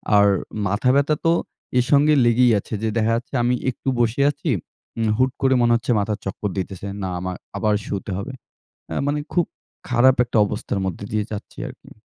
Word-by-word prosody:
আর 100 0 +6 0.4
মাথা 105 +6 +1
ব্যথা 145 +2 +3
তো 165 - +5 0.5
এর 125 - +3
সঙ্গে 145 +1 +5
লেগেই 120 +1 +5
আছে। 105 - -9
যে 110 - +1
দেখা 115 0 +2
যাচ্ছে 120 +4 -5
আমি 125 +1 +2
একটু 130 +1 -3
বসে 120 +3 +1
আছি, 145 +2 -5 0.5
উম 115 -1 +1
হুট 130 0 +3
করে 135 -1 +4
মনে 120 - +4
হচ্ছে 115 +1 -1
মাথার 105 +1 -1
চক্কর 100 +1 -3
দিতেছে 95 +1 -4
না 95 - -2
আমা 90 +1 -3 0.3
আবার 105 0 +1 0.2
শুতে 100 0 -4
হবে। 100 - -6 0.6
অ্যা - - -3
মানে 145 +1 0
খুব 175 - +3 0.4
খারাপ 125 +1 +5
একটা 120 - -4
অবস্থার 100 -1 -3
মধ্যে 95 +2 -4
দিয়ে 105 -1 +1
যাচ্ছি 105 - -8
আর - - -8
কি। - - -17
115 Hz, 195 wpm, -22 LUFS, 100-130 Hz, 0.6 s, আর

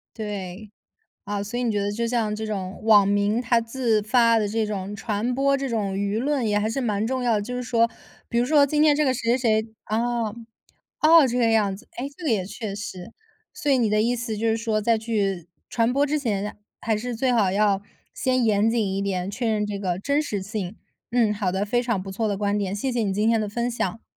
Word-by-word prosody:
对。 205 -1 -6 0.5
啊， 205 0 -3
所 215 +4 -4
以 250 - -1
你 235 - +1
觉 205 - 0
得 200 - -1
就 235 +2 -2
像 230 -3 0
这 220 - -4
种 195 -3 -4
网 210 -3 +6
民 205 +3 +1
他 235 -1 +2
自 230 -2 0
发 230 +1 +4
的 205 - 0
这 220 +1 0
种 200 -1 -4
传 220 +3 -2
播 275 +1 +3
这 270 -1 -3
种 205 -4 -1
舆 200 +2 -1
论 275 0 0
也 205 - +2
还 215 +1 0
是 250 +5 -2
蛮 215 -3 0
重 260 +1 -1
要 240 -2 +2
的。 205 - 0
就 250 +4 -5
是 250 - -3
说 230 -1 +2 0.4
比 - - -3
如 - - +2
说 285 +1 +5
今 300 +2 +1
天 295 -2 +5
这 300 - +2
个 260 - +2
谁 235 +1 +1
谁 220 -3 +2
谁 220 - -14
啊， 230 0 -1 0.7
哦， 315 -2 +7
这 245 - -1
个 235 -2 +3
样 205 -3 +2
子， 235 - -16
哎， 255 - -4
这 360 - -10
个 300 - +1
也 205 -5 +1
确 205 +1 -6
实。 200 0 -7 0.4
所 290 - -2
以 265 - +4
你 230 -3 +2
的 210 0 +2
意 240 +2 +1
思 230 -2 -3
就 225 +2 0
是 225 - +2
说 225 -1 -1
在 225 +1 +2
去 200 -6 -1 0.2
传 230 +1 +1
播 280 +2 +3
之 300 +1 0
前， 210 -6 -2 0.2
还 220 -1 0
是 245 +3 -4
最 255 +3 +1
好 205 -6 +2
要 200 -1 +2 0.3
先 255 -1 +1
严 215 0 +3
谨 225 -2 +1
一 195 - -1
点， 190 -1 -2
确 235 +2 -2
认 215 -1 +1
这 205 -1 -4
个 185 -2 -2
真 285 +7 +1
实 205 -10 -3
性。 200 -1 -5 0.4
嗯， 230 -4 +3
好 200 -3 -1
的， 190 +2 0
非 240 +4 +1
常 235 -6 -1
不 195 - -7
错 220 +3 -2
的 205 - -1
观 205 +1 0
点。 195 -1 -2
谢 255 +6 -2
谢 240 -2 0
你 200 -3 0
今 210 +2 +1
天 230 -1 +3
的 210 - -2
分 235 +3 -2
享。 225 -2 -3
220 Hz, 265 characters per minute, -24 LUFS, 205-240 Hz, 0.7 s, 哦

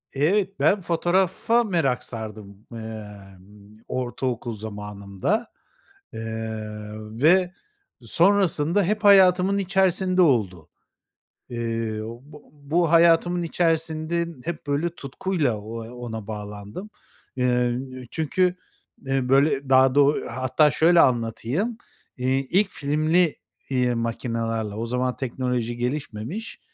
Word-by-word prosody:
Evet, 195 +7 +1
ben 200 0 +3
fotoğrafa 185 +7 +1
merak 165 - 0
sardım, 105 -3 -8 0.2
ımm, 105 -2 -11
ortaokul 120 -2 -3
zamanımda, 105 - -3 0.7
ııı, 110 -1 -6
ve 180 +3 +4 0.5
sonrasında 170 - +2
hep 210 +4 -1
hayatımın 190 -1 +6
içerisinde 190 -1 +2
oldu. 100 - +1 0.8
Iıı, 115 -2 -3 0.2
bu 150 +1 -15
bu 155 +3 0
hayatımın 170 +1 +4
içerisinde 165 0 0 0.2
hep, 165 -3 -5
böyle, 145 +4 0
tutkuyla 145 - -2
o 115 +2 -7
ona 115 -4 -7
bağlandım. 105 - -7 0.5
Iıı, 125 -1 +1 0.3
çünkü, 180 +3 +1 0.5
ııı, 135 -2 0
böyle, 135 0 +3
daha 130 0 +5
da 145 - +6
o 145 +2 +3
Hatta 130 +5 +2
şöyle 165 +5 +5
anlatayım, 125 - 0 0.4
iii, 130 +1 0
ilk 195 +2 +3
filmli, 155 +3 +1 0.3
iii, 125 -2 +1
makinalarla, 115 -2 -2
o 115 - -2
zaman 125 +1 -1
teknoloji 125 -2 -2
gelişmemiş, 135 - -4
130 Hz, 100 wpm, -24 LUFS, 115-170 Hz, 0.8 s, hayatımın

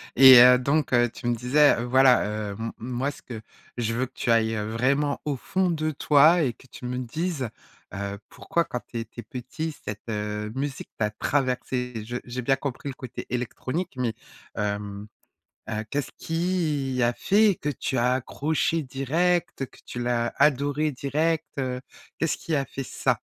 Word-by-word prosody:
et 130 -1 +10
heu, 125 +1 +9
donc 140 +2 0
heu, 120 0 +4
tu 120 - -7
me 120 - +2
disais, 125 +1 +4
voilà, 130 +1 +5 0.3
heu, - - -9
m 115 +1 -4
moi, 125 +4 -2
ce - - -14
que 115 -3 -8 0.3
je 115 -2 -1
veux 125 +3 0
que 130 - -16
tu 120 - -1
ailles, 115 -1 +3
heu, 105 +1 -3
vraiment, 140 +5 +1
au 145 -2 0
fond 185 +8 0
de 155 -2 0
toi 155 +4 +5
et 125 -4 0
que 130 - -20
tu 125 - -10
me 125 +1 -3
dises, 140 +1 -2 0.4
heu: 100 0 -4
«Pourquoi 170 - -1
quand 125 - -4
tu 115 - -5
étais 115 +1 -7
petit, 130 +7 -5
cette, 105 +2 -6
heu, 105 0 -3
musique, 135 0 -4
t'a 105 -1 +1
traversé?» 125 -2 -1
Je 120 +2 -5
j'ai 125 +1 -5
bien 135 +2 +2
compris 135 0 -5
le 135 - -4
côté 130 -3 -8
électronique, 130 +8 -3
mais 125 -3 0 0.4
hem, 105 0 -3 0.6
heu, 110 -1 -2
qu'est-ce 145 -1 -2
qui 160 -6 -1
a 120 0 +2
fait 205 - +3
que 150 - -1
tu 135 -2 -2
as 125 +1 +3
accroché 155 +5 0
direct, 145 +4 0
que - - -19
tu 120 - -6
l'as 120 -1 0
adoré 145 +1 +2
direct, 150 +4 0
heu, 130 -2 -2 0.4
qu'est-ce 165 -1 +1
qui 165 - -5
a 140 -2 +1
fait 135 - -6
ça? - - -1
130 Hz, 180 wpm, -26 LUFS, 120-145 Hz, 0.6 s, et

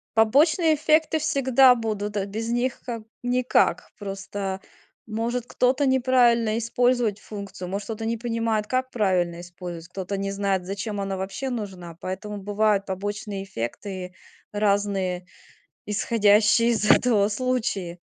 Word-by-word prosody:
Побочные 305 - +4
эффекты 310 +1 +2
всегда 270 -4 +5
будут, 210 -2 -3
э, 195 - 0
без 220 +3 -4
них 240 +1 -1
как 230 -3 -5 0.2
никак. 250 0 +2
Просто, 195 -1 -5 0.5
может, 230 +2 -2
кто-то 260 +3 +2
неправильно 240 -4 +3
использовать 235 -2 +1
функцию, 200 -3 -8
может, 200 +2 -4
кто-то 225 0 -5
не 230 0 -1
понимает, 230 -2 -1
как 255 0 -1
правильно 180 -6 +1
использовать, 175 -1 -8
кто-то 190 +1 -4
не 195 0 -2
знает, 195 -2 -1
зачем 200 +2 -4
она 195 -1 -2
вообще 195 +8 -4
нужна, 190 -8 -6
поэтому 205 +3 -5
бывают 205 0 +1
побочные 200 +1 -4
эффекты 180 - -5 0.4
разные, 200 -3 0 0.6
исходящие 215 +2 +3
из 215 -2 +1
этого 210 -5 +5
случаи. 215 -7 -2
210 Hz, 125 wpm, -25 LUFS, 195-240 Hz, 0.6 s, всегда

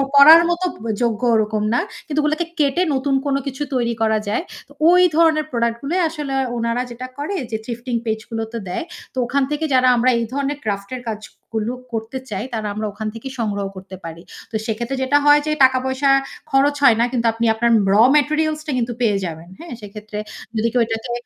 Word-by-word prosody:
পড়ার 310 +4 +10
মতো 345 +1 0 0.2
ব - - -8 0.2
যোগ্য 230 0 0
ওরকম 215 -1 0
না। - - +3 0.3
কিন্তু 300 0 -1
ওগুলোকে 310 +3 0
কেটে 290 +4 +2
নতুন 270 +1 0
কোনো 275 -1 +1
কিছু 275 +2 -3
তৈরী 235 -2 0
করা 220 -1 +3
যায়। 210 +11 -1 0.2
তো - - -23 0.2
ওই 360 +1 +6
ধরনের 320 -2 +4
প্রোডাক্ট 235 -1 0
গুলো 285 +5 -3 0.2
আসলে 295 -4 -5 0.2
ওনারা 230 +1 0
যেটা 255 +2 -7
করে 305 +8 -3 0.2
যে 220 - -1
থিফটিং 240 0 -4
পেজ 220 -1 -1
গুলোতে 225 0 -4
দেয়। 180 - -3 0.3
তো - - -12
ওখান 275 +3 +1
থেকে 305 +2 -1
যারা 255 0 +4
আমরা 245 +2 +3
এই 235 - 0
ধরনের 280 +1 -1
ক্রাফট 200 -2 -3
এর 250 - -7
কাজগুলো 220 +1 -5 0.2
করতে 225 +4 -4
চাই 200 +1 -3
তারা 220 -2 -2
আমরা 215 +1 -3
ওখান 215 +1 -5
থেকেই 245 +4 -7
সংগ্রহ 205 -3 -1
করতে 190 0 -9
পারি। 165 0 -8 0.3
তো - - -6
সেক্ষেত্রে 235 +4 -3
যেটা 285 +2 +3
হয় 295 0 +6
যে 305 - +1
টাকা-পয়সা 260 +1 +2 0.4
খরচ 280 +2 +3
হয় 240 -5 +7
না - - +4
কিন্তু 235 -2 0
আপনি 230 +1 -1
আপনার 235 +1 +1 0.2
রও 225 +4 +7
ম্যাটেরিয়ালস 305 +1 +1
টা 300 - -1
কিন্তু 240 0 -1
পেয়ে 210 -4 +2
যাবেন। 165 0 -7
হ্যাঁ? 335 -5 -8
সেক্ষেত্রে 210 +1 -8 0.4
যদি 220 - +2
কেউ 245 - +3
এটাকে 225 +2 -4
240 Hz, 200 wpm, -20 LUFS, 220-280 Hz, 0.4 s, পড়ার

